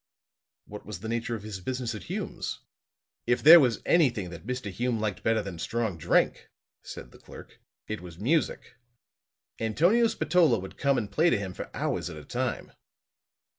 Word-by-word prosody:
"What 105 0 -10
was 100 -4 -8
the 110 - -6
nature 115 +1 -2
of 105 - -8
his 105 -3 -6
business 125 +2 -3
at 105 - -8
Hume's?" - - -5 0.7
"If 120 +1 +1
there 165 +4 +11
was 125 -6 +1
anything 120 - +2
that 85 +5 -10
Mr. 125 -5 -3
Hume 120 +3 -1
liked 105 -3 -2
better 110 -1 +1
than 95 -4 -7
strong 110 +2 -2
drink," - - +1 0.3
said - - -10
the - - -17
clerk, - - -13 0.3
"it 110 -2 -4
was 85 -2 -11
music. 125 - -1 0.8
Antonio 175 - +3
Spatola 170 - +3
would 95 -1 -8
come 140 -1 +1
and 105 -4 -3
play 165 +10 +3
to 125 - +2
him 95 -2 -5
for - - -7
hours - - -2
at 75 - -8
a 75 - -10
time." - - -3
115 Hz, 175 wpm, -28 LUFS, 100-130 Hz, 0.8 s, there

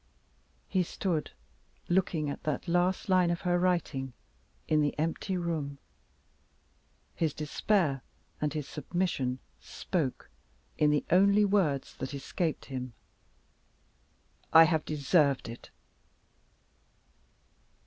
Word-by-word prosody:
He 185 - +1
stood, 170 -2 -2 0.6
looking 175 -4 +1
at 140 - -4
that 155 +3 -3
last 180 +2 +1
line 185 -2 +4
of 170 0 -1
her 175 -1 +1
writing, 165 -8 0 0.5
in 155 -1 +3
the 145 -1 0
empty 165 +4 -1
room. 160 -5 -3 1.4
His 160 -4 -1
despair 150 -1 +1 0.4
and 150 -1 +1
his 150 -2 -4
submission 150 -6 -2 0.2
spoke 155 -9 -3 0.4
in 150 - +3
the 150 -1 +1
only 200 +3 +5
words 185 -9 +1
that 135 +2 -5
escaped 160 +3 -2
him: 130 -2 -5 1.6
"I 165 - +10
have 160 -1 +1
deserved 145 -2 +2
it!" 115 +1 -9
160 Hz, 105 wpm, -30 LUFS, 140-180 Hz, 1.6 s, I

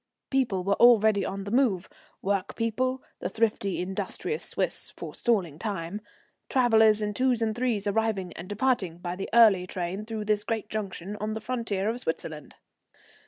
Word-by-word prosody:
People 240 -9 +1
were 200 +2 +1
already 220 -4 +6
on 195 +1 -4
the 200 - -6
move, 230 -8 +2 0.4
work 195 0 -1
people, 255 +3 -1 0.2
the - - -3
thrifty, 215 -4 0
industrious 190 - -3
Swiss, - - -1
forestalling 185 -11 -1
time, 200 -1 -4 0.5
travellers 220 -4 +4
in 210 0 -1
twos 255 +1 +2
and 225 -1 0
threes 240 -4 0
arriving 205 -4 0
and 185 - -9
departing 205 -6 0
by 175 0 -4
the 195 - -5
early 210 -6 +6
train 185 +3 -3
through 220 -1 -5
this 210 -1 +1
great 225 -1 -3
junction 200 -2 -4
on 215 +1 -3
the 220 - -3
frontier 220 -4 -2
of 230 +3 -1
Switzerland. 160 - -5
210 Hz, 160 wpm, -27 LUFS, 190-230 Hz, 0.5 s, already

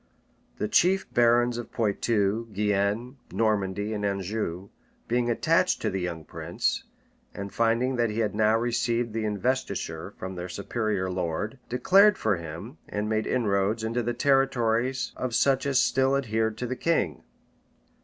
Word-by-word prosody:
The 105 - -1
chief 190 - +3
barons 120 0 +3
of 120 - -8
Poictou, 110 0 0
Guienne, 105 +5 0
Normandy, 105 -1 0
and 105 -1 -3
Anjou, 100 -2 -2 0.4
being 120 0 +1
attached 165 +9 +2
to - - +1
the 95 0 -2
young 85 -3 -4
prince, - - -2 0.5
and 100 0 -6
finding 115 +3 +1
that 120 -1 +2
he 105 - -4
had 110 -3 0
now 110 +1 +3
received 120 0 0
the 110 -1 -1
investiture 125 +6 -2
from 95 0 -6
their 90 0 -6
superior 100 0 -2
lord, 90 +7 -3
declared 195 +11 +5
for 105 -4 +1
him, 85 - -8
and 105 +1 -2
made 110 0 0
inroads 105 -2 +1
into 115 +2 -1
the 120 +1 -2
territories 130 -2 +1
of 125 -2 -3
such 135 +2 +2
as 135 -2 +3
still 130 +2 +3
adhered 110 -4 -1
to 125 - -3
the 125 +1 -3
king. 100 - 0
115 Hz, 150 wpm, -27 LUFS, 100-125 Hz, 0.5 s, declared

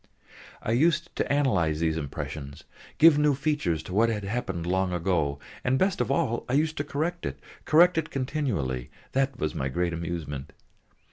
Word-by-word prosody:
I - - -1
used 165 +7 +2
to - - 0
analyse 95 - +2
these 80 0 0
impressions, 75 -1 -6 0.3
give 160 -2 +7
new 150 -1 +3
features 135 - 0
to 90 - -8
what 115 +4 +4
had 105 -2 -2
happened 100 -5 -3
long 95 +1 0
ago, 85 -5 0 0.3
and 130 +1 +2
best 190 +5 +1
of - - -1
all, 125 -9 0
I - - -1
used 155 +3 +2
to 145 - 0
correct 160 +4 -2
it, - - -4 0.3
correct 170 +2 +5
it 160 - -4
continually, 105 - -2 0.2
that 135 -1 0
was 75 - -2
my 65 - -2
great 85 +4 -1
amusement. 80 -5 -5
105 Hz, 175 wpm, -27 LUFS, -, 0.3 s, give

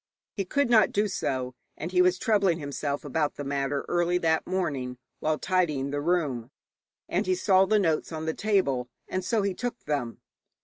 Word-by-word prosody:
He 195 - -2
could 280 +8 +1
not 230 -2 +5
do 210 +1 +1
so, 130 -9 -2 0.2
and 165 +4 -5
he 180 -1 +4
was 180 0 +4
troubling 195 -5 +2
himself 145 -1 -3
about 150 +1 0
the 145 - -5
matter 140 0 -1
early 175 0 +2
that 160 -2 +1
morning 140 -9 -2 0.2
while 155 0 0
tidying 150 -8 0
the 145 0 -1
room, 145 -8 0 0.6
and - - -1
he 370 - +3
saw 190 - +4
the 215 +3 +3
notes 165 -6 +1
on 160 -1 -4
the 160 - 0
table, 140 - +1 0.2
and 185 - -2
so 210 +3 +1
he 200 -1 0
took 240 +4 -5
them. 135 -6 -2
165 Hz, 185 wpm, -27 LUFS, 140-190 Hz, 0.6 s, not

